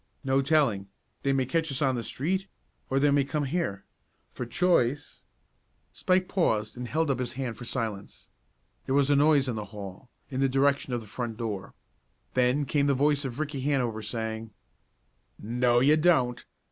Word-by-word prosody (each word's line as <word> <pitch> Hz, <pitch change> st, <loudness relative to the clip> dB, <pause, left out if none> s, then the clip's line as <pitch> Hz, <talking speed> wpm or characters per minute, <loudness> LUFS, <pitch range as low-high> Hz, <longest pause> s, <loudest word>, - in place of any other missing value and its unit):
"No 135 Hz, 0 st, +2 dB
telling. 135 Hz, -9 st, +2 dB, 0.3 s
They 140 Hz, -, +1 dB
may 135 Hz, -1 st, +1 dB
catch 160 Hz, +3 st, 0 dB
us 135 Hz, -, -1 dB
on 135 Hz, -3 st, +2 dB
the 120 Hz, -2 st, -3 dB
street, 185 Hz, +11 st, -2 dB, 0.4 s
or 135 Hz, -, +1 dB
they 145 Hz, +1 st, +4 dB
may 140 Hz, 0 st, +4 dB
come 145 Hz, +2 st, -2 dB
here. 135 Hz, -, -2 dB, 0.5 s
For 125 Hz, -, -5 dB
choice 145 Hz, -4 st, +1 dB, 0.3 s
" -, -, -44 dB
Spike 185 Hz, 0 st, +1 dB
paused 110 Hz, -, 0 dB
and 125 Hz, 0 st, -5 dB
held 155 Hz, +2 st, +1 dB
up 130 Hz, -, -1 dB
his 120 Hz, -1 st, -3 dB
hand 130 Hz, -3 st, -4 dB
for 120 Hz, -, -9 dB
silence. 110 Hz, -5 st, -5 dB, 0.6 s
There 135 Hz, -, +1 dB
was 140 Hz, 0 st, +3 dB
a -, -, +5 dB
noise 145 Hz, -1 st, +4 dB
in 125 Hz, -, -2 dB
the 105 Hz, -, -4 dB
hall, 100 Hz, +3 st, -9 dB, 0.2 s
in 130 Hz, -, -3 dB
the 135 Hz, 0 st, +3 dB
direction 140 Hz, 0 st, +2 dB
of 120 Hz, -, -1 dB
the 110 Hz, -, -12 dB
front 115 Hz, +1 st, -4 dB
door. 105 Hz, -5 st, -5 dB, 0.6 s
Then 130 Hz, +3 st, +2 dB
came 145 Hz, +1 st, +1 dB
the 140 Hz, -, +3 dB
voice 145 Hz, +1 st, +2 dB
of 130 Hz, +1 st, -4 dB
Ricky 150 Hz, -3 st, -3 dB
Hanover 125 Hz, -6 st, 0 dB
saying: 110 Hz, 0 st, -4 dB, 0.9 s
"No, 120 Hz, +2 st, +2 dB
you 145 Hz, +4 st, +6 dB
don't! 140 Hz, -7 st, +2 dB
130 Hz, 185 wpm, -28 LUFS, 120-145 Hz, 0.9 s, you